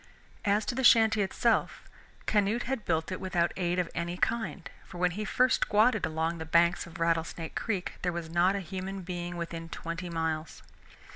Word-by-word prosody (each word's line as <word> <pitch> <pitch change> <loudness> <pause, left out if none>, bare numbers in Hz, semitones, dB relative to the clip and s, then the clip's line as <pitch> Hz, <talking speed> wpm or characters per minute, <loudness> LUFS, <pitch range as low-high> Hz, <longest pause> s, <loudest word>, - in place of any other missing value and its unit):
As 205 +1 +2
to - - -1
the 265 +2 -2
shanty 220 -3 +6
itself, 220 +4 +1 0.4
Canute 210 +3 +2
had 255 -3 -3
built 160 +1 0
it 185 - -4
without 175 -2 +1
aid 175 -1 0
of 180 -2 +1
any 175 +1 -3
kind, 225 -4 -1 0.2
for 175 - -11
when 180 0 +2
he 210 +4 -4
first 250 +4 +2
squatted 215 -3 +3
along 160 +1 -2
the - - -3
banks 170 +3 +3
of 170 0 -11
Rattlesnake 165 -1 -1
Creek 200 -6 -3
there 180 - 0
was 170 -1 -4
not 175 +4 +2
a 200 - -2
human 190 +2 -5
being 175 -1 -5
within 165 -1 -5
twenty 170 +2 -5
miles. 160 -1 -3
180 Hz, 185 wpm, -29 LUFS, 170-205 Hz, 0.4 s, shanty